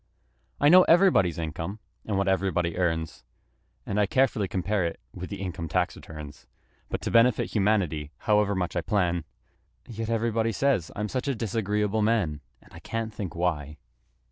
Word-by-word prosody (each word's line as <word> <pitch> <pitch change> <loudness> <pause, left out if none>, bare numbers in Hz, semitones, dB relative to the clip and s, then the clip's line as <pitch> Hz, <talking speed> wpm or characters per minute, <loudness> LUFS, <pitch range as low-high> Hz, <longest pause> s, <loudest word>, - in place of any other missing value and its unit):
I 145 - +4
know 180 +4 +9
everybody's 165 - +4
income 80 +4 -4 0.3
and 105 -3 0
what 100 - +1
everybody 95 -3 +1
earns, 80 -4 -1 0.6
And 100 - -1
I 105 - +3
carefully 115 -4 +2
compare 95 +2 -1
it 85 - -3
with 90 - -7
the 100 - -6
income 85 -4 -4
tax 90 +3 0
returns; 75 -2 -10 0.4
But - - -3
to - - -3
benefit 115 0 +4
humanity, 95 -8 +1 0.2
however 105 -1 +3
much 90 -1 -2
I - - +1
plan, 90 -5 0 0.6
Yet 115 -1 -5
everybody 115 0 0
says 135 - +1
I'm 105 +1 -2
such 130 +5 -3
a 140 - 0
disagreeable 105 -1 -1
man! 100 -10 +1 0.2
And - - -21
I - - -10
can't 115 -1 -4
think 95 -6 -5
why! 75 -4 -2
100 Hz, 165 wpm, -27 LUFS, 85-110 Hz, 0.6 s, know